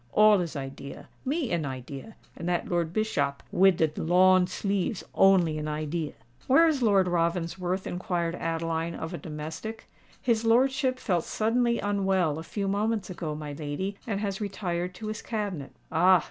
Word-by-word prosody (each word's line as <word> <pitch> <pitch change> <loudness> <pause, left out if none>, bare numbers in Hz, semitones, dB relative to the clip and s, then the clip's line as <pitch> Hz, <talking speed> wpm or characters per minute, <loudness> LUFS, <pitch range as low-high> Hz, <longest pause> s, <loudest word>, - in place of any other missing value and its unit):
All 210 -2 +6
is 170 -2 -4
idea—me 140 - -5
an 170 -2 0
idea—and 140 - -8
dat 175 -1 0
Lord 170 -2 0
Bischop 145 -9 -1
wid 190 -1 +5
de 160 -2 +2
lawn 185 +2 +5
sleeves 195 +2 -1
only 180 -5 +4
an 150 - -3
idea." 155 +1 -3 0.3
"Where 300 +6 +6
is 300 -5 +1
Lord 200 -5 +4
Ravensworth?" 175 +2 -1
inquired 175 -2 -2
Adeline 165 0 -2
of 160 +2 -5
a 175 - -4
domestic. 160 +8 -6 0.3
"His 230 -2 +1
lordship 260 +3 +3
felt 180 -9 0
suddenly 235 +2 +1
unwell 190 -6 +1
a - - -5
few 200 +3 -3
moments 205 0 0
ago, 160 -4 -4
my 150 -1 -6
lady, 155 +7 -3
and 200 -3 -1
has 200 -1 -2
retired 180 -3 -3
to 215 - -8
his 215 0 -4
cabinet." 200 - -3 0.2
"Ah! 180 +2 +6
180 Hz, 155 wpm, -28 LUFS, 165-210 Hz, 0.3 s, All